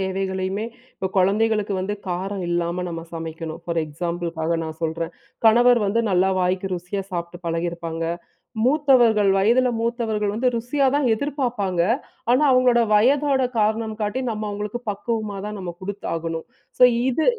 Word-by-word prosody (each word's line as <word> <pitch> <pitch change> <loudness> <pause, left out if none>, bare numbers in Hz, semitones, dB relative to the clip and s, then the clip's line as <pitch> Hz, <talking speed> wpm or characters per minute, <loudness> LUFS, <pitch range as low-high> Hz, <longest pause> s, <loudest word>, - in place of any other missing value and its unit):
தேவைகளையுமே 190 +2 -2 0.3
இப்போ 190 - -2
குழந்தைகளுக்கு 210 +2 +2
வந்து 200 +3 -2
காரம் 185 +2 -3
இல்லாம 175 +1 -1
நம்ம 165 -1 -5
சமைக்கணும். 165 0 -6
ஃபார் 170 -1 -1
எக்ஸாம்பிள்காக 170 +1 -2
நான் 160 0 -7
சொல்றேன். 165 +1 -2 0.3
கணவர் 240 +2 +6
வந்து 225 +4 +1
நல்லா 185 +1 +3
வாய்க்கு 185 +1 -1
ருசியா 180 +3 -4
சாப்புட்டு 175 0 -5
பழகியிருப்பாங்க. 165 0 -3 0.6
மூத்தவர்கள். 245 -7 +4
வயதில 235 +6 +4
மூத்தவர்கள் 225 -3 -1
வந்து 235 +4 +1
ருசியா 245 +5 0
தான் 285 -2 +2
எதிர்பார்ப்பாங்க. 240 - -1 0.5
ஆனா, 255 +5 +4
அவங்களோட 255 -2 +4
வயதோட 270 +5 +4
காரணம் 220 +1 +1
காட்டி, 210 +5 -1
நம்ம 215 -2 -3
அவங்களுக்கு 210 +3 -4
பக்குவமா 215 0 -3
தான் 210 0 -5
நம்ம 185 -2 -5
குடுத்தாகணும். 165 -4 -4 0.3
ஸோ - - +8 0.2
இது 285 +5 +1
200 Hz, 135 wpm, -23 LUFS, 175-235 Hz, 0.6 s, ஸோ